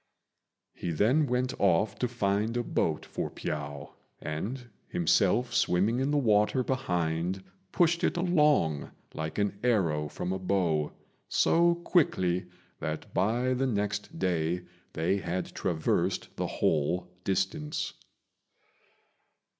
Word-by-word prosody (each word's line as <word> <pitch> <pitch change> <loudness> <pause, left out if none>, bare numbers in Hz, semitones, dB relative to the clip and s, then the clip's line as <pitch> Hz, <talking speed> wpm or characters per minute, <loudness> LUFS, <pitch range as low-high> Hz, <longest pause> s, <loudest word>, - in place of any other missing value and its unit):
He 90 - -5
then 120 - +3
went 125 0 0
off 100 +2 +3
to 125 - +1
find 110 0 0
a 120 - 0
boat - - -1
for - - -4
Piao, 70 -2 -5 0.3
and, 105 +12 -4 0.2
himself 95 +7 +2
swimming 100 +7 +2
in 135 +2 +1
the 145 - +2
water 110 0 +3
behind, 90 -8 -1 0.3
pushed 170 -1 +2
it - - +1
along 150 - +2 0.2
like 80 0 -4
an 100 -1 0
arrow 85 -11 +2
from 90 +5 -3
a 95 - -3
bow, 90 -5 +1 0.4
so 170 +1 +4
quickly 95 - +1 0.3
that 80 0 -5
by 120 +7 +1
the 135 +1 0
next 105 +6 -2
day 85 - 0 0.3
they 85 +5 +1
had 90 -1 -3
traversed 80 -4 -1
the - - -2
whole 80 +4 0 0.2
distance. 150 - -1
100 Hz, 120 wpm, -29 LUFS, 85-125 Hz, 0.4 s, so